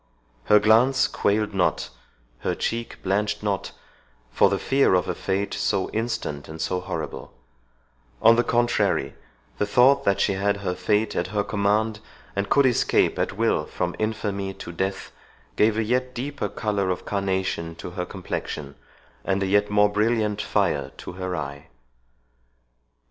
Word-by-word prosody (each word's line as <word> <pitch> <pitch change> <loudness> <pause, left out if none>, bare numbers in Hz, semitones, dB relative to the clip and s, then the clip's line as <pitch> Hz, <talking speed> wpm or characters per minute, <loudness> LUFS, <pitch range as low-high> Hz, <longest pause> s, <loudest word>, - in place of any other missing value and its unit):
Her 105 - +6
glance 115 +5 +4
quailed 105 +1 0
not, 95 -2 0 0.5
her - - -1
cheek 115 0 -4
blanched 100 +2 0
not, 100 -2 -2 0.6
for - - +4
the - - 0
fear 135 -8 +3
of 90 - +1
a - - -1
fate 100 +1 -2
so 95 -2 0
instant 110 -11 -3
and 80 +1 -8
so 90 +3 -1
horrible; 90 - -6 0.8
on 115 +1 +6
the 120 - +3
contrary, 120 -1 +1 0.5
the 105 - +1
thought 135 +5 +5
that 100 - +2
she 100 - +2
had 100 +1 0
her 90 - 0
fate 105 +3 0
at - - 0
her 105 +2 -1
command, 105 +2 0 0.4
and 100 0 -1
could 140 -1 +4
escape 125 -2 +2
at - - -1
will 75 - +2
from 90 -1 -3
infamy 100 -3 -2
to - - -8
death, 95 +3 -3 0.4
gave 110 0 +3
a 110 - +2
yet 125 +3 -1
deeper 135 -3 -3
colour 100 -3 -1
of 90 - -3
carnation 95 -4 -2
to 90 - -8
her 90 0 -3
complexion, 75 -6 -5 0.5
and 95 0 0
a - - +1
yet 105 +2 +2
more 105 0 +4
brilliant 105 -1 +1
fire - - 0
to - - -8
her 90 0 -4
eye. 70 -2 -6
105 Hz, 155 wpm, -24 LUFS, 95-110 Hz, 0.8 s, Her